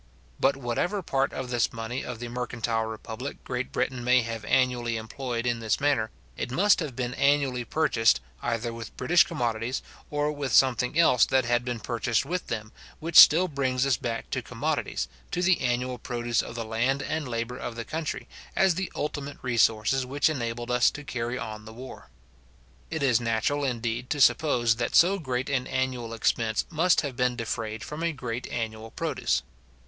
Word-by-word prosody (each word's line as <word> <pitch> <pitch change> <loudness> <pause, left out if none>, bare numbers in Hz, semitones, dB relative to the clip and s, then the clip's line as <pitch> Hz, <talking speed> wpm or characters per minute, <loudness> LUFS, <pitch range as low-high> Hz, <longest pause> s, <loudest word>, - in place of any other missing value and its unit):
But 135 0 +3
whatever 140 - -1
part 135 -3 0
of 130 -1 -5
this 120 -1 +1
money 115 +3 -4
of 125 - -5
the 120 +1 -6
mercantile 120 -2 -2
republic 110 +4 -7
Great 125 0 -3
Britain 130 -2 -1
may 125 0 +4
have 115 -1 -5
annually 120 -3 +1
employed 120 +1 -4
in 120 -1 0
this 110 -1 0
manner, 140 -6 +1 0.3
it - - -4
must 195 +11 +4
have 150 -7 -4
been 125 -1 -2
annually 140 -3 +2
purchased, 115 - +2 0.2
either 115 0 -2
with 115 -1 -9
British 175 0 +5
commodities, 120 -5 -2 0.3
or 145 0 0
with 145 -4 -3
something 130 +2 +3
else 145 -8 +5
that 130 -2 +2
had 120 0 +1
been 120 -2 -3
purchased 115 0 0
with 180 +1 -3
them; 110 -1 -4 0.3
which 165 +1 -5
still 175 +4 +9
brings 135 -4 0
us 135 -2 +3
back 115 -1 -4
to - - -1
commodities, - - -2 0.2
to 180 - -1
the 185 0 +3
annual 125 0 -1
produce 120 -1 -1
of - - -8
the 115 -1 -3
land 125 +5 0
and 155 -2 -2
labour 120 +1 -3
of 120 - -5
the 115 0 -5
country, 160 0 -4 0.3
as 190 -2 +4
the 185 +2 -3
ultimate 145 -1 -4
resources 120 +1 +2
which 140 +4 +1
enabled 120 -3 -3
us 125 -1 +5
to 150 - -8
carry 120 -4 -3
on 110 -3 -6
the 110 - -10
war. 130 +3 -10 0.8
It 160 - -3
is 125 -4 +3
natural, 115 +5 0
indeed, 120 -1 -2
to 145 - -1
suppose, 120 -3 +4
that 120 - -1
so 190 +4 +5
great 130 -4 -2
an 130 -2 -1
annual 130 -3 -2
expense 110 0 +1
must 170 +2 +3
have 140 -4 -4
been 125 -1 +1
defrayed 115 -2 -4
from 150 +2 -6
a 170 0 +1
great 125 -4 -5
annual 110 -1 -4
produce. - - -1
125 Hz, 185 wpm, -27 LUFS, 115-140 Hz, 0.8 s, still